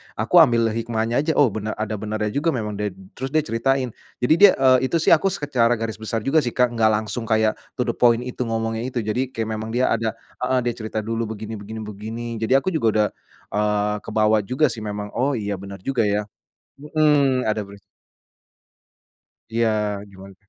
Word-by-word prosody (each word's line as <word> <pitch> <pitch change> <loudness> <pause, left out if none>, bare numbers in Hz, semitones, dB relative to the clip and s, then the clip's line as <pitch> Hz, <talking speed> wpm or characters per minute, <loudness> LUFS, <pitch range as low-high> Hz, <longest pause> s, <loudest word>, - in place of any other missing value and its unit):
aku 115 +11 +2
ambil 120 -7 +5
hikmahnya 115 +1 -1
aja, 160 +2 0
oh 140 - +5
benar, 110 +1 -3
oh - - -4
ada 110 0 -2
benarnya 105 +1 -2
juga 145 +9 0
memang 105 -4 -3
ded 105 -2 -2 0.2
terus 130 +1 -3
dia 155 - +4
ceritain, 130 +1 0 0.3
jadi 125 +5 +4
dia, 200 0 +8
eee, 130 -1 +4
itu 170 - +2
sih - - +5
aku 170 +4 +3
secara 130 -9 +1
garis 110 -2 -4
besar 110 +1 -2
juga 155 +3 +3
sih, 125 - -1
Kak, 125 -1 +2
gak 110 -1 +4
langsung 110 +2 -4
kayak 110 -1 +3 0.2
to - - 0
the 120 - -1
point 120 0 +3
itu 125 0 -6
ngomongnya 115 0 -2
itu. 125 -2 -2
Jadi, 125 +4 -1
kayak 110 -1 -3
memang 110 +1 -4
dia 125 +2 +2
ada 115 -2 0 0.3
heeh 130 0 +2
dia 120 - 0
cerita 110 -1 -5
dulu 115 +1 -2
begini 110 +1 -6
begini 110 +2 -7
begini, 110 +3 -6 0.2
jadi 120 +4 +4
aku 165 - -1
juga 155 -8 +1
udah, 105 -1 +3 0.5
eee, 105 0 +1
kebawa 110 0 +2
juga 130 +9 +2
sih 110 - -7
memang, 105 -1 -5
"Oh 135 +4 +1
iya 105 -3 -3
bener 100 0 -9
juga 130 0 0
ya," 105 0 +1 0.6
heeh, 145 -3 +2
ada 105 -1 -1
ben 100 0 -12 1.7
Iya, 115 0 +1 0.4
gimana? 95 0 -13
115 Hz, 195 wpm, -22 LUFS, 110-130 Hz, 1.7 s, dia